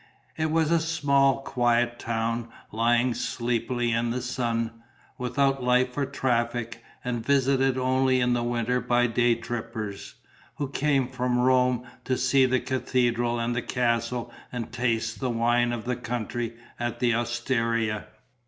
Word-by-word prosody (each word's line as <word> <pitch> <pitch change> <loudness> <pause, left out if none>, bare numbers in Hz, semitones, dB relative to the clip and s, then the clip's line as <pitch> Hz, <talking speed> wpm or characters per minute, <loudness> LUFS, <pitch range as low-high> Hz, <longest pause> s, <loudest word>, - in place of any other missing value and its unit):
It 155 0 0
was 160 0 +2
a 170 - +4
small, 140 -4 +2
quiet 120 -2 +1
town, 115 0 -2 0.2
lying 120 +3 +2
sleepily 120 0 -1
in 115 +1 +1
the 120 +2 -1
sun, 115 -2 -2 0.4
without 135 +2 +1
life 125 0 +2
or 140 -2 0
traffic, 120 -3 -1 0.2
and 120 -2 -2
visited 135 0 +2
only 130 0 +2
in 125 0 +2
the 120 - +1
winter 120 +1 0
by 120 0 +2
day 120 0 +2
trippers, 115 -3 -5 0.4
who 145 -2 -3
came 140 -2 +1
from 125 -1 -1
Rome 125 0 +3 0.2
to 130 - 0
see 130 +1 +4
the 130 0 +2
cathedral 120 -2 0
and 120 +1 -1
the 125 - 0
castle 120 0 -1 0.2
and 120 -3 -5
tasted 115 -2 -1
the 130 - -1
wine 120 +1 +2
of 120 -1 -4
the 125 0 0
country 120 -1 -3 0.2
at 120 0 -3
the 120 -1 +2
osteria. 115 -2 -1
120 Hz, 145 wpm, -26 LUFS, 115-130 Hz, 0.4 s, a